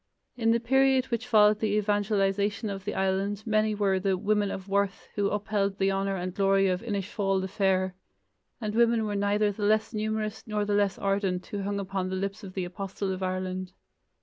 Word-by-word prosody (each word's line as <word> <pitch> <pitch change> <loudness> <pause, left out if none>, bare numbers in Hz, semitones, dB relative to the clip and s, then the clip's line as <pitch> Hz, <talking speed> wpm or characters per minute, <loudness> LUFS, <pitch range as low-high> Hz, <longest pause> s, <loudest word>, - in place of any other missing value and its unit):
In 225 -2 +1
the 230 +1 +4
period 265 +2 +3
which 235 +1 -2
followed 210 -3 +5
the 215 -2 0
evangelization 205 0 0
of 195 -1 -6
the 210 - -3
island 195 +2 0
many 215 -1 +2
were 195 -2 +1
the 190 0 +1
"women 210 +1 +1
of 190 0 -6
worth" 200 0 -1
who 200 -1 +1
upheld 200 -1 -1
the 195 0 +2
honor 195 0 -1
and 180 -1 -4
glory 195 0 +3
of 180 0 -1
"Inisfail 200 -2 -1
the 190 - -2
Fair", 190 -2 +1 0.7
and 215 -3 -3
women 230 -1 +3
were 210 - -2
neither 205 +1 +2
the 205 - -9
less 215 +2 +2
numerous 215 0 -2
nor 210 -1 -1
the 205 - -1
less 205 -1 +2
ardent 195 -2 -1
who 205 - -5
hung 200 +1 -2
upon 190 -1 -3
the 190 - -2
lips 195 +2 -3
of 185 -2 -9
the 185 -2 -1
Apostle 195 +2 -4
of 185 - -6
Ireland. 185 0 -3
200 Hz, 200 wpm, -28 LUFS, 195-215 Hz, 0.7 s, followed